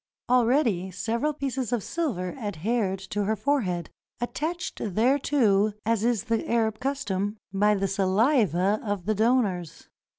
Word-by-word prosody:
Already 235 - +3
several 230 - -1
pieces 270 -4 -3
of 240 -5 0
silver 235 - -2
adhered 205 - -1
to 205 0 0
her 220 +2 +1
forehead 205 - -1
— - - -50
attached 315 +8 -3
thereto, 220 -1 +2
as 225 -1 +1
is 235 -4 +1
the 225 0 -1
Arab 220 -2 +1
custom, 215 -7 -2 0.2
by 210 +2 +3
the 195 0 0
saliva 200 - +2
of 205 -5 -3
the 215 - +1
donors. 215 -7 0
220 Hz, 135 wpm, -26 LUFS, 195-250 Hz, 0.2 s, Already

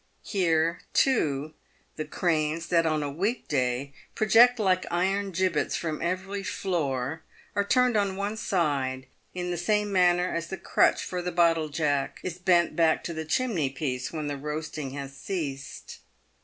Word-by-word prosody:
Here, 165 -3 +1
too, 155 - +2 0.4
the 155 - -4
cranes, 160 0 -1
that 165 -1 +3
on 155 -1 0
a 145 - -3
week 200 - -2
day 130 0 -1 0.2
project 230 +4 +6
like 185 -4 +1
iron 195 +3 0
gibbets 185 -3 0
from 155 -3 -3
every 185 +3 -2
floor, 160 -7 -2 0.3
are 205 - +2
turned 250 +3 +3
on 200 -2 +1
one 200 +2 -2
side, 140 -10 -1 0.3
in 180 0 -3
the 175 - -2
same 210 +3 +1
manner 180 -1 +4
as 170 0 -2
the 190 - -5
crutch - - +2
for 180 -1 -3
the 180 0 -3
bottle 165 -2 +3
jack 145 -2 -1
is 180 -1 -5
bent 175 -1 +3
back 165 -2 +3
to 170 - -4
the 160 0 -4
chimney 170 - 0
piece 130 -2 -3
when 155 -2 -4
the 145 -1 -3
roast 150 +2 -5
ing 140 -3 -3
has 140 -1 -6
ceased. 140 -5 -5
170 Hz, 165 wpm, -27 LUFS, 150-190 Hz, 0.4 s, project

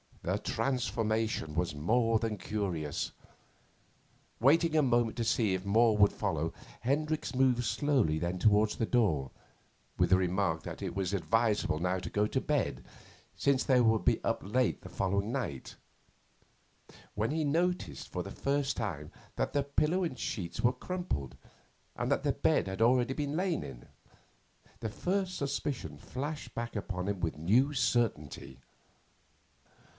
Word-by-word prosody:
The - - 0
transformation 110 - -1
was 85 -2 0
more 115 +9 +2
than 110 -2 -2
curious. 90 -8 -3 1.3
Waiting 160 +6 +4
a 155 - +5
moment 120 -3 +2
to 120 - 0
see 110 -3 +2
if 95 +1 -3
more 110 +2 +4
would 100 -1 +6
follow, - - -2 0.3
Hendricks 150 +5 -1
moved 125 -2 +3
slowly 115 - +1
then 85 +2 -2
towards 105 +1 +4
the 115 - 0
door, 90 - +1 0.7
with - - +2
the 95 - +7
remark 90 -3 0
that - - -7
it - - -4
was 95 -1 -1
advisable 105 -1 +1
now 90 +2 0
to 85 -2 -6
go 105 +3 +1
to 130 - -1
bed 145 -5 -1 0.5
since 140 -2 +2
they 130 -2 +4
would 110 -5 +3
be - - +2
up - - 0
late 125 +5 0
the - - -10
following 100 +3 -1
night 120 - -4 1.4
when 105 +2 0
he 160 +1 0
noticed 165 - -1
for - - -3
the - - -8
first 140 0 -1
time 80 -10 -4 0.2
that - - -1
the 145 -1 +2
pillow 150 +6 +1
and 160 -7 -3
sheets 90 -7 -4
were 125 +1 +4
crumpled 125 - -4 0.6
and - - -2
that - - +1
the - - +2
bed - - +2
had 95 +3 -4
already 125 +2 +4
been 145 +1 -2
lain 180 -1 0
in. - - -10 0.9
The 110 - -3
first 185 - -1
suspicion 140 -2 -3
flashed 145 +4 -6
back 115 0 -4
upon 95 -3 -3
him 100 -2 -1
with 80 -3 -1
new 115 - +3
certainty. 115 - -1
115 Hz, 150 wpm, -31 LUFS, 95-135 Hz, 1.4 s, the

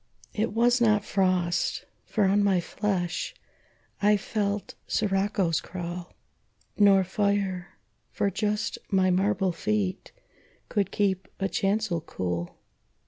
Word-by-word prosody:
It 225 +1 0
was 240 +2 +3
not 215 -3 +3
frost, 185 -2 +1 0.2
for 215 - 0
on 200 +1 +3
my 195 -3 +3
flesh 180 -1 -2 0.7
I 210 +1 +5
felt 205 0 -2
siroccos 195 -4 +1
crawl, 175 0 -6 0.6
Nor 200 -2 +6
fire, 195 -1 -1 0.3
for 200 - 0
just 210 +3 -1
my 190 -2 +3
marble 190 0 +2
feet 105 - -2 0.6
Could 200 -3 0
keep 190 -2 0
a 195 - +1
chancel 195 -1 0
cool. 90 - -4
195 Hz, 110 wpm, -27 LUFS, 180-205 Hz, 0.7 s, Nor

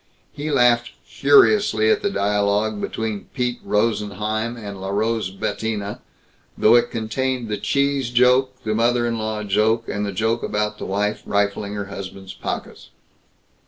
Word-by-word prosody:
He 150 +2 -5
laughed 120 -4 +3
furiously 140 - +4
at - - +2
the 200 - 0
dialogue 105 - 0
between 110 -3 -4
Pete 125 -2 -1
Rosenheim 110 +1 -1 0.2
& - - -8
Larose 105 +1 -1
Bettina, 105 +1 -3 0.6
though 110 - +5
it 120 - +4
contained 120 +2 -2
the 105 - -1
cheese 140 +1 0
joke, 125 +2 +3
the 110 - -1
mother 120 +2 +2
in 115 -1 -1
law 110 -1 -3
joke, 110 +3 +1
and 100 - -2
the 100 - -2
joke 110 +4 0
about 105 0 -2
the - - -5
wife 105 +2 -1
rifling 100 0 0
her 100 -1 -3
husband's 95 -1 -8
pockets. - - -6
110 Hz, 145 wpm, -22 LUFS, 105-120 Hz, 0.6 s, though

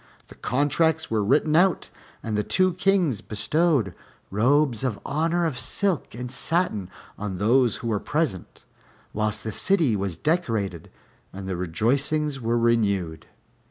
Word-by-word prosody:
The - - -10
contracts 155 +4 0
were 110 -2 +1
written 150 +8 +2
out, 180 +2 +2 0.3
and 110 -2 -3
the 105 - +2
two 185 - +2
Kings 185 - +1
bestowed 110 - 0 0.4
robes 125 +3 +2
of 120 -6 -1
honor 165 +4 0
of 140 -6 -2
silk 190 +1 -1
and 125 +1 -6
satin 130 - -1 0.3
on 100 -2 -4
those 120 +4 +3
who 115 - -6
were 105 -2 0
present, 145 - -3 0.5
whilst 105 0 -1
the 110 - -3
city 165 - +2
was 95 -4 -3
decorated 110 - -1 0.4
and 95 0 -8
the 95 - -2
rejoicings 135 - 0
were 115 +1 0
renewed. 100 -8 0
125 Hz, 140 wpm, -24 LUFS, 105-155 Hz, 0.5 s, those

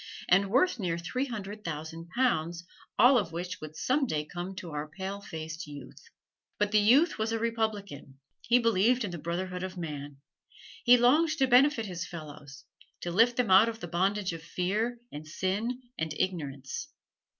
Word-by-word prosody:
and 195 +2 +4
worth 260 - +3
near 175 -4 -1
three 250 +11 -2
hundred 210 -3 -6
thousand 165 +1 -6
pounds, 175 -9 +1 0.3
all 245 +3 +7
of 180 -6 -4
which 175 +2 -5
would 155 0 -8
some 265 - +1
day 150 -5 -1
come 175 +4 -6
to 175 -3 -7
our 150 0 -4
pale 195 +4 -5
faced 160 -1 -7
youth. 145 -3 -11 0.5
But 210 -1 +1
the 215 - +5
youth 265 +11 +4
was 220 +1 0
a 225 - 0
republican 215 -11 -3 0.2
he 240 +1 +4
believed 230 +1 +3
in 200 - -3
the 170 - -6
brotherhood 180 +3 -3
of 185 0 -5
man. 145 -4 -6 0.7
He 245 0 +8
longed 305 +7 +4
to 270 - +4
benefit 255 -1 +4
his 180 -2 -5
fellows, 145 -3 -10 0.4
to 175 - -3
lift 230 +6 +4
them 245 -6 +1
out 195 +5 +7
of 225 -1 -7
the 175 - -6
bondage 190 +2 0
of 165 - -7
fear, 205 +8 -1
and 150 +1 -8
sin, 200 +9 -2 0.2
and 160 -1 -2
ignorance. 145 - -3
190 Hz, 175 wpm, -29 LUFS, 165-230 Hz, 0.7 s, He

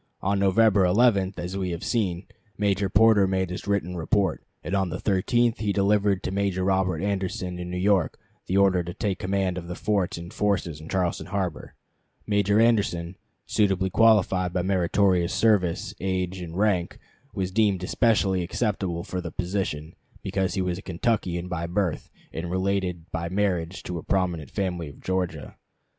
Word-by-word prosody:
On 100 +1 +1
November 100 +1 +4
11, 100 0 +3
as 90 +2 -4
we 95 -2 -2
have 85 0 -4
seen, 95 -6 -1 0.3
Major 100 -1 +1
Porter 110 -2 +5
made 95 -1 -1
his 90 - -6
written 95 -3 -1
report, 90 +1 0 0.2
and 90 - -5
on 95 -2 +1
the 90 - -3
13th 115 +5 +1
he 105 -2 0
delivered 100 -1 +2
to - - -2
Major 95 -1 0
Robert 95 -3 +1
Anderson 95 -2 -2
in 90 0 -5
New 90 - -3
York 95 +1 +2 0.3
the 95 - +1
order 95 -2 +4
to 85 +1 -7
take 100 -3 -2
command 95 -1 -1
of 85 - -10
the 90 - -5
forts 100 -4 0
and 85 +3 -8
forces 95 -8 -1
in 80 - -10
Charleston 90 -2 -1
harbor. 95 -4 -3 0.5
Major 105 0 +2
Anderson, 100 -7 +2 0.3
suitably 95 -3 +1
qualified 95 -5 +4
by 90 - 0
meritorious 90 -1 +2
service, 100 -7 +2
age, 95 0 -2
and 85 0 -7
rank, 100 -4 +1 0.4
was 95 -1 -2
deemed 100 -3 +2
especially 100 -3 +2
acceptable 90 -2 -2
for 90 0 -4
the 85 - -6
position 90 -5 -3 0.3
because 95 -2 -1
he 95 - 0
was 90 0 -2
a - - -9
Kentuckian 90 -2 -1
by 85 -2 -3
birth, 90 -1 -1 0.2
and 85 +1 -4
related 95 -2 -1
by 85 -1 -3
marriage 95 -2 -1
to 90 -1 -4
a - - -7
prominent 90 -7 -1
family 90 -5 -3
of 70 - -14
Georgia. 90 -5 -3
95 Hz, 170 wpm, -25 LUFS, 90-100 Hz, 0.5 s, Porter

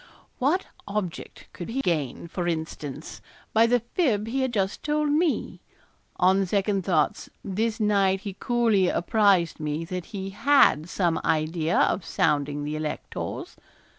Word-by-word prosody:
What 300 +9 +1 0.2
object 200 -4 -5
could 175 - -7
he 250 +4 -2
gain, 165 - -2
for 175 0 -3
instance, 160 -3 -5 0.3
by 225 +1 +5
the 245 0 +2
fib 230 - +1
he 260 +4 -1
had 260 -1 0
just 195 -3 -1
told 300 0 0
me? 315 +1 0 0.5
On 190 +2 +3
second 195 0 0
thoughts 160 -5 0
this 215 +3 -1
night 200 -3 +2
he 200 -2 -5
coolly 230 -6 +2
apprised 190 -4 +2
me 155 +1 -3
that 180 0 -5
he 195 -2 -6
had 205 - +4
some 170 -2 0
idea 160 +1 0
of 190 - +2
sounding 145 -2 0
the 150 +1 -3
electors. 155 -1 -5
190 Hz, 140 wpm, -26 LUFS, 165-225 Hz, 0.5 s, by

